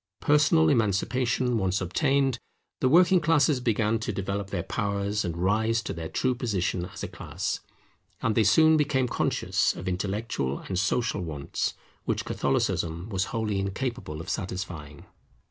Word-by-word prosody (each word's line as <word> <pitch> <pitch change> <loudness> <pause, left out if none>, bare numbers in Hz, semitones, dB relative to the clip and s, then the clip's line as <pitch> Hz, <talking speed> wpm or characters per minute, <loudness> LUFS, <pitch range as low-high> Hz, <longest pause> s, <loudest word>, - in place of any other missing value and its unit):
Personal 145 - +4
emancipation 120 +3 +1
once 95 0 0
obtained, 135 - +1 0.4
the 130 - +2
working 175 +3 +5
classes 150 -3 +3
began 115 -2 +1
to 105 - -3
develop 100 0 -3
their 90 -4 -2
powers 100 +1 -1
and 85 -3 -3
rise 110 +5 +1
to - - -4
their 80 -1 -6
true 130 - +1
position 100 -7 -1
as - - -9
a - - -2
class; - - -4 0.6
and 115 - +1
they 110 - +3
soon 155 +10 +5
became 140 -4 +1
conscious - - 0
of - - -7
intellectual 95 - -2
and 95 -2 -3
social 100 +1 0
wants 75 -5 -3 0.3
which - - -1
Catholicism 85 +4 -1
was 95 -3 0
wholly 110 -2 -2
incapable 100 - -3
of - - -10
satisfying. 90 -7 -5
105 Hz, 145 wpm, -27 LUFS, 95-125 Hz, 0.6 s, working